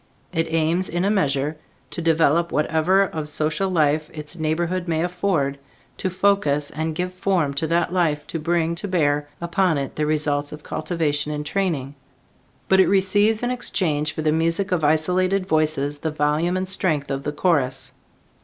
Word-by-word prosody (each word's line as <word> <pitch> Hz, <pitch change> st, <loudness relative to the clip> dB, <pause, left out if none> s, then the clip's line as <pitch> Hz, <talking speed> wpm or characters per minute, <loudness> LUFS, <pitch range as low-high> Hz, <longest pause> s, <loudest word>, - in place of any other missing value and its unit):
It 165 Hz, -1 st, -1 dB
aims, 165 Hz, +3 st, +1 dB
in 175 Hz, +2 st, -1 dB
a 200 Hz, -, +2 dB
measure, 150 Hz, -6 st, 0 dB, 0.3 s
to 160 Hz, -, -5 dB
develop 165 Hz, 0 st, +2 dB
whatever 160 Hz, +5 st, +2 dB
of 155 Hz, -5 st, -4 dB
social 155 Hz, +5 st, 0 dB
life 155 Hz, -3 st, +1 dB
its 150 Hz, +2 st, -7 dB
neighborhood 170 Hz, +3 st, -1 dB
may 160 Hz, -1 st, 0 dB
afford, 175 Hz, -6 st, -1 dB, 0.4 s
to 190 Hz, -, -2 dB
focus 185 Hz, -7 st, +1 dB
and 160 Hz, +1 st, -3 dB
give 180 Hz, +2 st, -3 dB
form 185 Hz, -6 st, 0 dB
to 150 Hz, +3 st, -1 dB
that 170 Hz, +2 st, 0 dB
life, 160 Hz, -5 st, +1 dB
to 165 Hz, -, -5 dB
bring 165 Hz, +1 st, 0 dB
to 205 Hz, -, -5 dB
bear 145 Hz, -5 st, +1 dB
upon 170 Hz, -1 st, +1 dB
it 140 Hz, -1 st, -4 dB
the 150 Hz, 0 st, 0 dB
results 145 Hz, -1 st, 0 dB
of 150 Hz, 0 st, -9 dB
cultivation 155 Hz, -3 st, -2 dB
and 150 Hz, 0 st, -4 dB
training; 150 Hz, -7 st, -1 dB, 0.7 s
but 190 Hz, -, +4 dB
it 190 Hz, -, +6 dB
receives 205 Hz, +3 st, +3 dB
in 245 Hz, -, 0 dB
exchange 160 Hz, -11 st, -1 dB
for 155 Hz, -, -4 dB
the 155 Hz, -, +2 dB
music 165 Hz, +5 st, 0 dB
of 175 Hz, -3 st, 0 dB
isolated 185 Hz, +5 st, +2 dB
voices 155 Hz, -4 st, 0 dB
the 160 Hz, -, -2 dB
volume 155 Hz, +4 st, 0 dB
and 185 Hz, 0 st, -2 dB
strength 155 Hz, -7 st, 0 dB
of 135 Hz, 0 st, -2 dB
the 150 Hz, -, -3 dB
chorus. 145 Hz, -5 st, 0 dB
160 Hz, 170 wpm, -22 LUFS, 150-185 Hz, 0.7 s, it